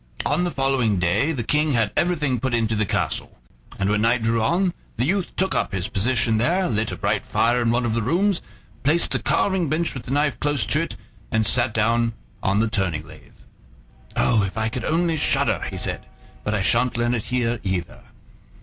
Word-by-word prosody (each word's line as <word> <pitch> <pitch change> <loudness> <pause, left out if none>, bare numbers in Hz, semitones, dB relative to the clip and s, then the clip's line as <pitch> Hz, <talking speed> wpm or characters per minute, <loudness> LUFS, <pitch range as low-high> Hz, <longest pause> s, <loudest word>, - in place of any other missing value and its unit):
On 160 +5 +1
the - - 0
following 135 - +1
day 90 - +1
the 130 -7 -2
King 150 +4 +1
had 115 -4 +1
everything 150 -8 +1
put 130 0 0
into 115 -1 0
the 105 -1 0
castle; - - -2 0.4
and 100 - 0
when 105 +1 +1
night 115 +1 +2
drew 115 0 +1
on 175 - +1 0.2
the 120 - +1
youth 190 +4 0
took 190 +1 0
up - - -1
his 95 +1 -2
position 115 +2 +2
there, 175 +11 +2
lit 110 -1 -1
a - - -4
bright - - -1
fire 120 +1 +1
in 115 - +1
one 120 +1 +1
of 115 - 0
the 115 - 0
rooms, 180 - +1 0.4
placed 160 +5 +1
the - - 0
carving 190 -6 +1
bench 160 +2 0
with 130 - -6
the - - -10
knife 145 0 +1
close 145 -4 +1
to 150 - +1
it, 165 - -4 0.3
and 110 0 +1
sat 120 +3 +3
himself 115 - -7
down 115 +1 +2 0.3
on 95 +1 +1
the 110 +2 +2
turning 90 -8 -1
lathe. - - -16 0.7
"Oh! 110 -3 +3
if 95 +2 -3
I 110 0 0
could 120 0 -4
only 165 0 +1
shudder!" - - +1
he - - -6
said: - - -3 0.4
"but 105 - -1
I 100 - 0
sha'n't 120 +2 +2
learn 120 0 +1
it 115 -4 -2
here 120 -2 -1
either." 95 -3 -3
120 Hz, 215 wpm, -23 LUFS, 110-150 Hz, 0.7 s, sat